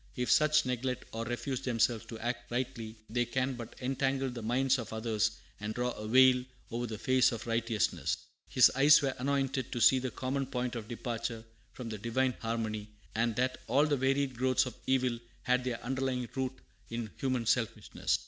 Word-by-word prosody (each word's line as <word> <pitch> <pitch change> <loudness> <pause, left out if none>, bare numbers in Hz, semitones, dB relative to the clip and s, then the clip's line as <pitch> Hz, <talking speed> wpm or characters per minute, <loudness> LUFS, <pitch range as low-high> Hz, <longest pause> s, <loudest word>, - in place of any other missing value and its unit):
If 125 -1 0
such 155 0 +5
neglect 125 0 -2
or 115 +1 -4
refuse 120 +2 -3
themselves 115 -2 +1
to 115 - -7
act 120 +2 -4
rightly, 120 -3 -3
they 120 +2 +1
can 130 +2 -1
but 120 -2 -8
"entangle 135 0 0
the 120 -1 -6
minds 130 +4 +2
of 115 - -6
others 110 -1 +1 0.3
and 105 +1 -4
draw 125 0 0
a 105 -2 -6
veil 130 +1 +6 0.3
over 120 +1 -2
the 110 -1 -5
face 130 +3 +3
of 115 -2 -5
righteousness." 115 -2 0 0.3
His 130 - +6
eyes 145 +3 +7
were 135 -1 +1
anointed 135 -1 0
to 120 - -2
see 130 +3 +6
the 130 0 -2
common 130 +3 -2
point 125 -1 -2
of 110 -2 -5
departure 115 -1 -4 0.3
from 125 -3 -6
the 110 -2 -5
Divine 125 +4 +1
harmony, 110 -2 -2 0.3
and 115 0 +1
that 130 +2 0
all 140 +6 +4
the 150 -2 +2
varied 135 0 +1
growths 130 +2 +2
of 125 - -5
evil 130 -2 +2 0.2
had 125 0 +2
their 120 -2 -2
underlying 130 -1 -1
root 130 -1 -1 0.4
in 115 -2 -4
human 130 -3 -1
selfishness. 115 0 0
125 Hz, 185 wpm, -32 LUFS, 115-130 Hz, 0.4 s, eyes